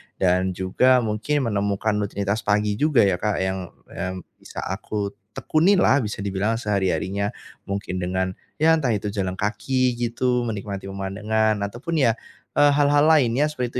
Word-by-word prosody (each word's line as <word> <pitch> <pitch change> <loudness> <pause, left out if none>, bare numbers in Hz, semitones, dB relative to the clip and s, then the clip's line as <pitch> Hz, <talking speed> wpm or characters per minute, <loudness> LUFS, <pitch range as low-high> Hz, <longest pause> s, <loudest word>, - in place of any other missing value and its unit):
dan 95 0 +1
juga 125 +7 +3
mungkin 115 +7 -1
menemukan 100 +1 0
rutinitas 100 +1 -1
pagi 105 0 +1
juga 150 -6 +4
ya, 95 -3 +2
Kak, 105 0 0
yang, 95 -1 -2 0.2
yam 95 0 -4 0.2
bisa - - -8
aku 100 -2 -3 0.2
tekuni 170 +6 +3
lah 145 -6 +4
bisa 105 -3 -4
dibilang 100 +3 0
sehari-harinya. 100 -2 -1 0.3
Mungkin 100 -2 -3
dengan, 95 +1 -1 0.3
ya 160 - +6
entah 135 -7 0
itu 105 0 -3
jalan 95 -3 -2
kaki 125 +4 0
gitu, 120 +1 0
menikmati 100 -2 -5
pemandangan, 105 +3 0
ataupun 150 +9 -3
ya, 115 - +4 0.4
eee, 145 0 +5
hal-hal 145 0 +4
lainnya 145 0 +3
seperti 125 -3 -3
105 Hz, 150 wpm, -23 LUFS, 100-125 Hz, 0.4 s, ya